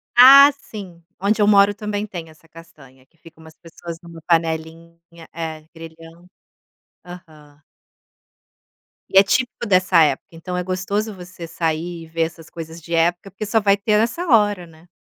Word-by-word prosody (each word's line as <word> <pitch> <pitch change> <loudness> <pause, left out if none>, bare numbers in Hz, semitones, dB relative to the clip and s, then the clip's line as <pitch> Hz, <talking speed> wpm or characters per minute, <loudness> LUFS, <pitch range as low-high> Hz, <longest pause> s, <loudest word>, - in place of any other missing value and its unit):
Ah, 275 +3 +9
sim. 185 -9 -11 0.2
Onde 210 +3 0
eu 205 - +3
moro 200 0 +5
também 210 0 -4
tem 170 -5 -9
essa 160 +1 -21
castanha, 145 -6 -17
que 165 +4 -38
ficam 160 0 -18
umas 160 0 -16
pessoas 170 0 -10
numa 170 -1 -13
panelinha, 165 0 -2 0.3
é, 160 -1 -6
grelhando. 165 +1 -14 0.8
Aham. 155 -4 -15 1.5
E 190 - +1
é 195 - +9
típico 245 +3 -1
dessa 185 -4 +3
época, 140 -3 -1
então 180 +2 -6
é 180 - -2
gostoso 200 +4 -3
você 180 -2 -11
sair 165 +1 -3
e - - -13
ver 165 0 -2
essas 165 0 -7
coisas 165 0 -9
de 170 +1 -8
época, 175 +3 0
porque 205 +2 -6
só 220 +1 +1
vai 200 -1 +3
ter 210 +1 +1
nessa 235 +11 -1
hora, 205 - +2
né. 160 +2 -20
170 Hz, 165 wpm, -20 LUFS, 165-200 Hz, 1.5 s, Ah